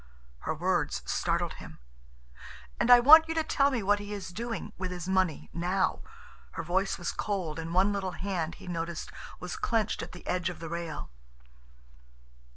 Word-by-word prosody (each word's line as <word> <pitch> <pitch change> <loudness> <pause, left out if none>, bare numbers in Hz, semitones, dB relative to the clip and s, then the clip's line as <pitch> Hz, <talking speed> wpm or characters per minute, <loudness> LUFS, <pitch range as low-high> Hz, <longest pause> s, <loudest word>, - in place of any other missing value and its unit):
Her - - -3
words - - 0
startled - - 0
him. - - -11 1.0
"And - - +2
I 245 0 +10
want 315 +6 +9
you 325 - -3
to 320 - +2
tell 280 -2 +3
me 245 -6 -1
what 205 +1 +3
he 205 0 -6
is 195 -2 -5
doing—with 225 -4 -4
his 180 -1 -6
money—now." 185 0 0 0.5
Her - - -4
voice 190 +4 0
was 175 - -2
cold, 180 -7 -3
and 165 0 -5
one 190 +3 +3
little 190 -2 -2
hand, 175 -4 -2
he - - -13
noticed, 170 -2 -4 0.3
was 180 -1 -5
clenched 225 -2 0
at - - -7
the 180 - -11
edge 180 0 0
of 180 - -7
the 165 - -6
rail. 170 - -5
185 Hz, 165 wpm, -29 LUFS, 170-210 Hz, 1.0 s, I